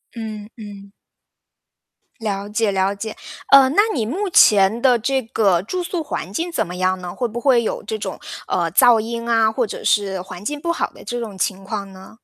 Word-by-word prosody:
嗯， 215 -2 -7
嗯。 200 -2 -11 1.3
了 200 -3 -3
解 215 -1 0
了 190 +1 +1
解。 215 +2 -6 0.3
嗯， 275 0 +7
那 410 - +6
你 230 -6 -1
目 375 - -2
前 210 - +5
的 250 -3 +4
这 265 +3 0
个 200 -6 +1
住 365 - -3
宿 345 -2 -3
环 185 - -5
境 340 - -3
怎 220 - -1
么 180 - -7
样 185 0 0
呢？ 175 -1 -6
会 245 - -1
不 235 +2 -5
会 250 -4 +3
有 - - -3
这 220 +2 -4
种， 195 -3 -6 0.3
呃， 170 -3 0
噪 240 +3 +6
音 230 +1 -4
啊， 225 -1 +3
或 240 +1 0
者 - - -7
是 195 -3 +1
环 185 +1 -10
境 295 +5 -3
不 340 - -1
好 - - -1
的 - - -15
这 240 - -4
种 215 -5 -6
情 190 +1 -2
况 200 -1 -5
呢？ 190 +3 -14
220 Hz, 220 characters per minute, -20 LUFS, 195-240 Hz, 1.3 s, 嗯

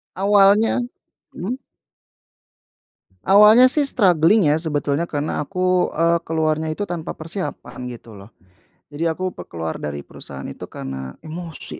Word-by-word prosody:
Awalnya 200 +2 +4 0.6
mhm? 235 +9 -4 1.7
Awalnya 210 +6 +7
sih, 295 - +2
struggling 180 - +4
ya, - - +3
sebetulnya 150 0 -1
karena 150 0 -2
aku, 185 +1 +1
eee, 170 +1 +3
keluarnya 160 -1 0
itu 205 +6 -3
tanpa 175 -4 -5
persiapan, 160 -6 -6
gitu 120 -2 -10
loh, 100 0 -12 0.6
jadi 160 +3 -1
aku 185 +3 -3 0.2
keluar 80 -1 -4
dari 70 -1 -5
perusahaan 70 0 -10
itu - - -8
karena 65 -1 -7
emosi, 165 +1 -8
165 Hz, 120 wpm, -21 LUFS, 145-195 Hz, 1.7 s, Awalnya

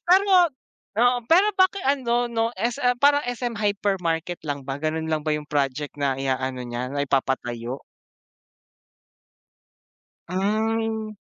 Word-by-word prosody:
Pero 385 +3 +6 0.7
oo 245 +1 +4
pero 370 +5 +6
bakit 375 -1 +2
ano 245 -3 +1
'no, 230 -1 0
SM 245 +2 0
parang 285 +1 +4
SM 245 -1 -3
Hypermarket 190 -5 -1
lang 140 -3 -4
ba, 135 0 -3
gano'n 160 +1 -1
lang 155 -1 -1
ba 155 - -2
yung 150 -1 -2
project 145 0 -1
na 140 -2 -1
i-aano 130 -1 -2
niya 120 +2 -4
na 140 0 -1
ipapatayo? 130 -2 -1 2.5
Mm. 220 +2 -1
185 Hz, 120 wpm, -24 LUFS, -, 2.5 s, Pero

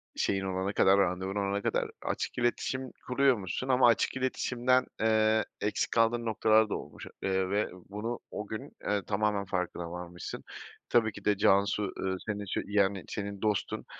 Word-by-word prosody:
şeyin 95 -1 0
olana 95 +1 -1
kadar, 95 0 +5
randevun 95 +1 0
olana 100 0 0
kadar - - 0
açık - - -3
iletişim 125 +2 -1 0.2
kuruyormuşsun 125 -4 +1
ama 130 -1 +5
açık 120 +2 +2
iletişimden, 130 0 +1 0.2
eee, 110 -1 +3 0.2
eksik 105 - 0
kaldığın 115 +1 +2
noktalar 110 0 +3
da - - -1
olmuş, - - -8
eee, 95 -1 0
ve 105 +2 +1 0.2
bunu 110 +4 -4
o 105 - -5
gün, 110 0 -6
eee, 105 -1 0
tamamen 105 -1 0
farkına 90 -2 -3
varmışsın. 90 0 -7 0.5
Tabii 115 -2 +3
ki - - -12
de 105 -1 +3
Cansu, 100 +1 +3
ııı, 95 0 -1
senin 105 -2 -2
için, 95 - -2
yani, 100 -2 +2
senin 100 -1 -5
dostun. 105 -3 -1
105 Hz, 160 wpm, -30 LUFS, 95-115 Hz, 0.5 s, kadar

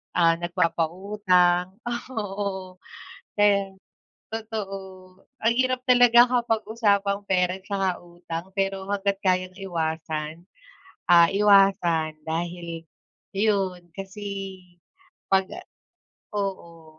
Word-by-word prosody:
ah, 165 -1 +4
nagpapautang. 180 +1 +1
Ah, 240 0 -3
oo, 195 -3 -4 0.6
ayan 200 -2 +2 0.6
totoo. 215 -3 -4 0.6
Ang 225 +1 +3
hirap 255 0 +1
talaga 245 -1 +7
kapag 235 -3 +1
usapang 200 -3 +1
pera 180 -1 +1
tsaka 190 -1 -1
utang, 175 0 -7
pero 195 0 -1
hangga't 200 -1 0
kayang 185 0 +1
iwasan, 160 -3 -4 0.6
ah, 170 -1 +7
iwasan 195 -6 +3
dahil 170 0 -4 0.5
iyon, 195 -4 0
kasi 195 -1 -6 0.7
pag-a 190 - +1 0.8
oo, 170 -5 -5
190 Hz, 90 wpm, -25 LUFS, 175-205 Hz, 0.8 s, talaga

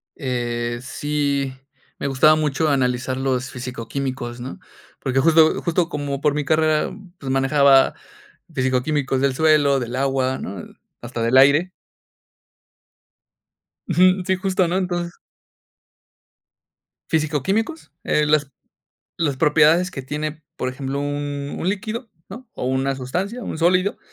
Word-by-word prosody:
Eh. 120 -3 -2
Sí, 140 0 -1 0.5
me - - -2
gustaba 140 +3 +5
mucho 155 0 0
analizar 130 -2 0
los 130 -1 -1
fisico-químicos, 125 0 -5
¿no? 130 - -7 0.4
Porque 130 0 0
justo 160 +2 +4
justo 170 0 0
como 145 -3 -3
por 150 - +2
mi 150 0 -2
carrera, 155 0 +2 0.3
pues 135 -5 -5
manejaba 135 0 +4 0.6
fisico-químicos 130 +1 0
del 135 -2 +1
suelo, 150 -3 +4
del 120 0 -4
agua, 130 -1 0
¿no? 95 -2 -6 0.4
Hasta 120 -1 -5
del 120 +3 +3
aire. 145 +7 +5 2.2
Ujú. 185 +1 +4
Sí, 190 - +2
justo, 185 -1 0
¿no? 175 +2 0
Entonces 175 -2 -2 2.0
¿Fisico-químicos? 175 - -1
Eh, 150 - +2
las 150 -2 +2 0.7
las 145 -5 0
propiedades 160 +4 +4
que 140 - -6
tiene, 150 +3 -4
por 130 - -2
ejemplo, 135 +1 -4
un 145 0 -3
un 175 - -1
líquido, 220 +5 -3 0.2
¿no? 235 +4 -10
O - - -5
una 135 +1 0
sustancia, 185 - -3
un - - -5
sólido, 180 +4 +2
145 Hz, 125 wpm, -21 LUFS, 130-160 Hz, 2.2 s, gustaba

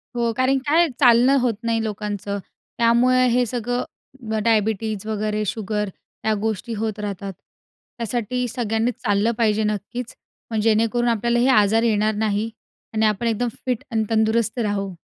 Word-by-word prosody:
हो, 235 -1 +1
कारण 260 +1 +3
काय 330 +4 +4
चालणं 250 +1 +6
होत 245 -2 +2
नाही 230 -1 0
लोकांचं. 205 -2 -3 0.4
त्यामुळे 245 +2 +4
हे 245 +1 +3
सगळं 245 0 -4
डायबिटीज 215 -1 0
वगैरे 215 0 -1
शुगर, 210 0 -2 0.4
या 220 - +3
गोष्टी 220 +2 -2
होत 215 0 -3
राहतात. 200 -1 -4 0.6
त्यासाठी 240 +2 -2
सगळ्यांनीच 230 0 -1
चाललं 205 0 +2
पाहिजे 220 -2 +2
नक्कीच. 215 +3 -4 0.4
मग 220 - 0
जेणेकरून 225 +2 +2
आपल्याला 235 +1 +1
हे 245 - +3
आजार 220 -2 +4
येणार 215 -1 +2
नाही 215 +1 0 0.4
आणि 220 0 +2
आपण 215 +2 +1
एकदम 230 +2 0 0.2
फिट 250 -3 -1
आणि 220 -1 +1
तंदुरुस्त 220 +1 +1
राहू. 200 -3 -1
225 Hz, 145 wpm, -22 LUFS, 210-240 Hz, 0.6 s, चालणं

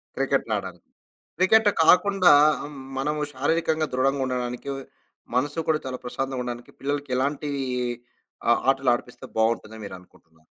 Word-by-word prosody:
క్రికెట్‌ని - - 0
ఆడడానికి. - - -8 0.5
క్రికెట్ 210 +4 +5 0.2
కాకుండా 185 -1 +5 0.3
ఆహ్, 145 -1 -10 0.2
మనము 150 +2 -1
శారీరకంగా 155 +3 0
దృడంగా 135 +1 +1
ఉండడానికి, 125 +1 -3 0.7
మనసు 145 +5 0
కూడా 155 -1 +3
చాలా 130 -1 -4
ప్రశాంతంగా 130 +1 -3
ఉండడానికి 120 -1 -7
పిల్లలకి 145 0 -3
ఎలాంటి 145 +3 -1 1.0
ఆహ్, 120 - +4
ఆటలు 135 -2 +2
ఆడిపిస్తే 125 0 -7
బాగుంటుంది 110 -1 0
అని 110 - -10
మీరు 95 - -8
అనుకుంటున్నారు? 80 -3 -25
135 Hz, 130 wpm, -25 LUFS, 125-150 Hz, 1.0 s, క్రికెట్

